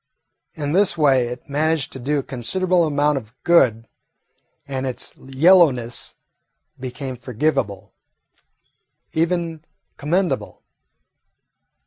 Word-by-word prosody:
In 145 -2 -3
this 190 +1 +3
way 135 -5 +3
it 125 +1 -8
managed 150 0 0
to 130 - -8
do 145 +4 -1
a 140 - -1
considerable 170 +9 +1
amount 145 -1 +1
of 115 0 -18
good, 120 -10 +3 0.8
and 135 -1 -3
its 130 - -5
yellowness 135 -4 +3 0.6
became 130 +1 -5
forgivable, 125 -4 -2 1.2
even 165 -1 -1 0.3
commendable. 175 +5 -1
140 Hz, 95 wpm, -21 LUFS, 125-165 Hz, 1.2 s, this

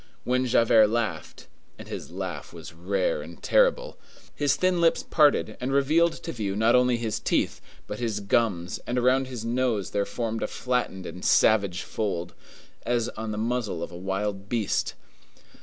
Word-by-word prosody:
When 125 +1 +1
Javert 115 -2 +5
laughed,—and 115 0 -5
his - - -7
laugh - - -6
was - - -10
rare - - -1
and - - -11
terrible,—his - - 0
thin 185 -1 +1
lips 165 -1 +3
parted 150 -3 +3
and 130 +2 -2
revealed 155 +5 +3
to 165 - -4
view 100 -6 -3
not 110 +3 +3
only 125 -1 +4
his 115 -2 -2
teeth, - - 0 0.2
but 105 - -6
his 115 -4 -1
gums, 100 -4 0
and 125 - -1
around 130 +2 +3
his 120 -3 -6
nose 115 -4 0
there 100 -1 0
formed 115 -2 -3
a - - 0
flattened 125 -7 -2
and 90 - -8
savage 100 -4 +3
fold, 85 -5 -3 0.5
as 120 -1 0
on 110 0 -5
the 105 - -4
muzzle 115 -5 -2
of - - -6
a - - -9
wild 95 +2 -3
beast. 115 -4 -1
115 Hz, 160 wpm, -26 LUFS, 105-130 Hz, 0.5 s, Javert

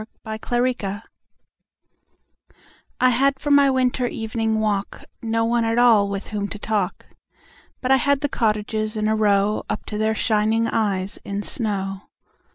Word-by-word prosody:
Good 220 0 -5
Hours 240 -5 0 2.0
I 255 - +5
HAD 275 +3 +2
for 290 - -2
my 285 -1 +6
winter 255 -1 +1
evening 225 -1 -2
walk 205 -2 -2 0.2
No 225 0 0
one 235 0 +1
at 225 +1 0
all 225 -5 +5
with 200 0 -5
whom 205 -2 -2
to 205 - -7
talk, 205 -3 -2 0.8
But 255 - 0
I 265 - +7
had 280 0 +1
the 290 - +1
cottages 215 -3 -1
in 215 0 0
a 220 - +2
row 205 -1 +2
Up - - -3
to 210 - -5
their 220 0 +1
shining 220 +1 +1
eyes 200 -4 -1
in 200 +1 -4
snow. 195 -4 -3
220 Hz, 155 wpm, -22 LUFS, 205-240 Hz, 2.0 s, I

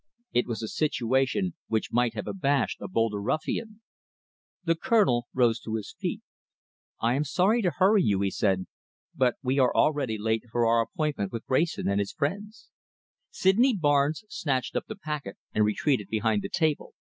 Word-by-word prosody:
It 120 - +2
was 115 -1 -4
a - - -2
situation 135 - 0
which 110 -1 -1
might 120 -1 +2
have 105 - -4
abashed 145 -7 0
a - - -4
bolder 115 - 0
ruffian. 215 - -3 0.8
The 165 -1 +2
Colonel 165 - +2
rose 120 -2 +2
to 110 -1 -4
his 110 -2 -5
feet. - - -3 0.8
"I 115 +2 +2
am 140 +3 +1
sorry 190 - +2
to 185 - +2
hurry 195 +4 +3
you," 100 - +2
he 100 -1 0
said, 95 -2 0 0.5
"but 125 -2 +2
we 130 +2 +1
are 130 -2 +4
already 140 -7 +2
late 110 +2 -1
for 120 0 +2
our 115 0 +4
appointment 125 - -2
with 115 -1 -5
Wrayson 160 +6 +1
and 100 +1 +1
his 100 - -2
friends." 205 +9 -4 0.6
Sydney 230 +7 +3
Barnes 145 +3 +2
snatched 135 -10 -2
up - - -2
the 220 - -6
packet 150 - -5 0.2
and 105 - +3
retreated 105 0 0
behind 110 -1 +1
the - - -5
table. 155 -3 -1
130 Hz, 170 wpm, -27 LUFS, 110-165 Hz, 0.8 s, are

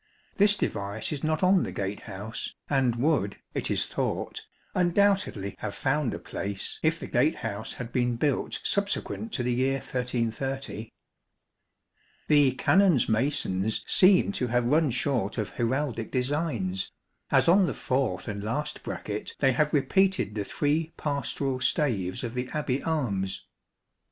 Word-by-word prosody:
This 205 0 +6
device 100 - -2
is 145 -3 -4
not 155 +2 0
on 185 0 +5
the - - -3
gate 100 +1 -3
house, 105 +5 -6
and 130 -4 +2
would, 120 -6 +1 0.2
it - - -1
is - - +1
thought, - - -3 0.3
undoubtedly 185 - +2
have 100 - -4
found 135 -1 0
a - - -4
place 100 -1 -4
if 160 +1 +1
the - - -6
gate 135 +6 +2
house 110 0 -3
had 120 -1 -7
been 120 -1 +1
built 140 +2 0
subsequent 200 +2 -1
to 125 - 0
the 125 0 0
year 130 +2 +1
1330. 125 -1 -3 1.4
The 145 -4 +5
Canons' 180 0 +4
masons 110 -4 +1
seem 190 +1 +5
to 130 -11 -1
have 120 0 +1
run 150 +4 +3
short 125 -4 -1
of 105 -3 -1
heraldic 120 -1 -1
designs, 125 - -1 0.4
as - - +4
on 185 +2 +6
the - - -2
fourth 130 0 -1
and 100 -2 -4
last 150 +8 -2
bracket 105 0 -5
they 135 -1 +3
have 150 +4 +1
repeated 190 - +2
the 105 -1 -2
three 155 +8 0
pastoral 140 -2 -2
staves; 115 - +1
of 120 -1 -4
the 125 0 -3
Abbey 140 -3 -1
arms. 105 -12 -2
130 Hz, 145 wpm, -27 LUFS, 110-155 Hz, 1.4 s, This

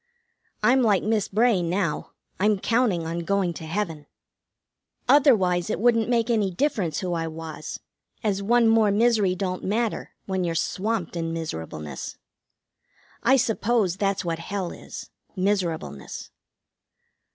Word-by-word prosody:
I'm 260 +1 +5
like 210 -6 +3
Miss 215 -1 +1
Bray 220 -2 +3
now. 170 -1 -1 0.3
I'm 210 +1 +3
counting 215 -5 +1
on 165 +1 -3
going 185 0 0
to 160 - -8
heaven. 165 -5 -3 1.0
Otherwise 195 - +4
it - - -1
wouldn't 230 -1 +3
make 235 -1 +2
any 215 -4 +2
difference 185 - -1
who 180 -2 -2
I 165 -1 -1
was, 160 -1 -7 0.4
as 200 -2 0
one 235 +3 +4
more 225 -1 +5
misery 210 -3 +3
don't 185 -1 -3
matter 220 +3 -1
when 190 -1 -1
you're 170 -1 -1
swamped 190 +1 -1
in 165 -1 -2
miserableness. 80 - -5 1.0
I 265 +3 +5
suppose 225 -5 +1
that's 195 -2 0
what 165 -1 -2
hell 185 +1 -3
is: - - -9 0.2
Miserableness. 175 - -2
195 Hz, 130 wpm, -25 LUFS, 170-225 Hz, 1.0 s, I'm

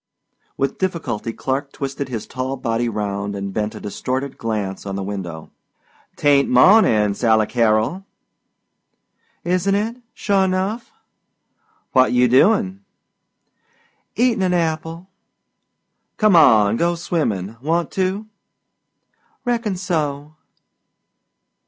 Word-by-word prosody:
With 135 0 -2
difficulty 165 - -2
Clark 135 +4 -3
twisted 135 0 -4
his 115 -4 -4
tall 130 +1 -4
body 120 -1 -1
round 100 -1 -3
and 100 -1 -5
bent 105 +1 -2
a - - -7
distorted 130 +6 -4
glance 105 -4 -3
on 100 -1 -5
the 100 - -3
window. 90 -5 -6 0.6
"Tain't 140 -1 +3
mawnin', 125 - +5
Sally 110 0 +2
Carrol." 115 - +1 1.4
"Isn't 185 +3 +1
it, 220 +4 -2 0.2
sure 200 -2 +1
enough?" 190 - -2 1.0
"What 130 -1 +4
you 125 0 +4
doin'?" 195 - +3 1.3
"Eatin' 240 -4 +2
'n 180 -1 +1
apple." 165 +1 -2 1.1
"Come 215 -4 +4
on 110 -8 +5
go 170 +4 +1
swimmin' 115 - -2
want 165 +4 -1
to?" 190 +3 -1 1.2
"Reckon 235 -5 -1
so." 155 -5 -3
140 Hz, 105 wpm, -20 LUFS, -, 1.4 s, mawnin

